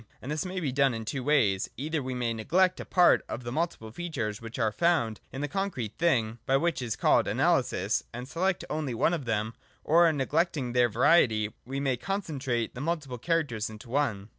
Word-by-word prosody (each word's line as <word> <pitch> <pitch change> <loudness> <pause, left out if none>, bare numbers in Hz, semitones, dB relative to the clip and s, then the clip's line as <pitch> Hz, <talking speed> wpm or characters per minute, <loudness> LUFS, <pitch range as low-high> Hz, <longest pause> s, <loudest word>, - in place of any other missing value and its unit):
And 135 - -6
this 155 +5 -2
may 185 0 -3
be 150 -7 -1
done 135 -1 +2
in 110 -1 -5
two 130 +3 -3
ways. 120 -10 +2
Either 155 +3 -2
we 130 -1 -4
may 120 -2 -1
neglect 175 - +2
a - - -6
part 180 -1 +4
of 125 - -5
the 120 - -5
multiple 155 -7 -3
features 120 -10 -4
which 115 0 -8
are 110 -3 +1
found 135 -7 +1
in 135 - -5
the 145 - -1
concrete 180 - -3
thing 120 -9 +1
(by 135 - +4
what 165 -1 0
is 115 -4 -2
called - - +3
analysis) - - +1
and 125 +2 -7
select 180 +5 -1
only 150 -5 -3
one 165 - +2
of 155 -6 -3
them; 110 -1 -1 0.3
or, 165 +1 +5
neglecting 145 -2 0
their 125 -1 +4
variety, 115 -4 +3
we 135 +1 -3
may 135 -3 0
concentrate 140 - -2
the 125 - -7
multiple 150 -6 -3
characters 145 -9 -1
into 110 +3 -11
one. 115 -7 -1
135 Hz, 200 wpm, -28 LUFS, 115-165 Hz, 0.3 s, or